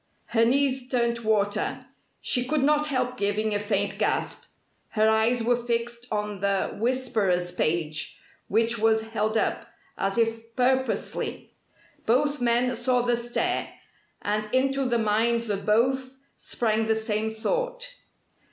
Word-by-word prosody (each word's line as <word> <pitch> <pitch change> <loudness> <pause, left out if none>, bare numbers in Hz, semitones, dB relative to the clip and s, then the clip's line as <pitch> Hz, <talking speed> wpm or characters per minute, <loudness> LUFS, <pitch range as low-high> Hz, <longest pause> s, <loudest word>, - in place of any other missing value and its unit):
Her 230 -1 +4
knees 265 0 +2
turned 235 -2 +1
to 235 -2 -8
water. 205 -1 0 0.4
She 250 - +2
could 300 0 +1
not 300 +1 +3
help 255 -3 -1
giving 205 +2 0
a 205 - +1
faint 205 -1 -1
gasp. - - -1 0.4
Her 215 0 +2
eyes 220 +2 +2
were 240 +1 +3
fixed 235 0 -3
on 210 -1 -2
the 200 0 0
"Whisperer's" 215 -8 0
page, 155 -4 -1 0.3
which 230 +2 +2
was 220 0 +2
held 220 0 0
up - - -1 0.3
as 195 +3 -1
if 230 0 -1
purposely. 260 +1 -1 0.5
Both 285 +4 +2
men 245 +1 +2
saw 245 +1 +1
the 245 0 +2
stare: 240 0 -1 0.5
and 215 +1 -1
into 270 +1 +1
the 240 -2 +1
minds 230 +1 +1
of 200 0 -4
both 260 +4 +2 0.2
sprang 220 -1 -1
the 220 - +3
same 220 0 -1
thought. - - -2
230 Hz, 140 wpm, -26 LUFS, 215-250 Hz, 0.5 s, Her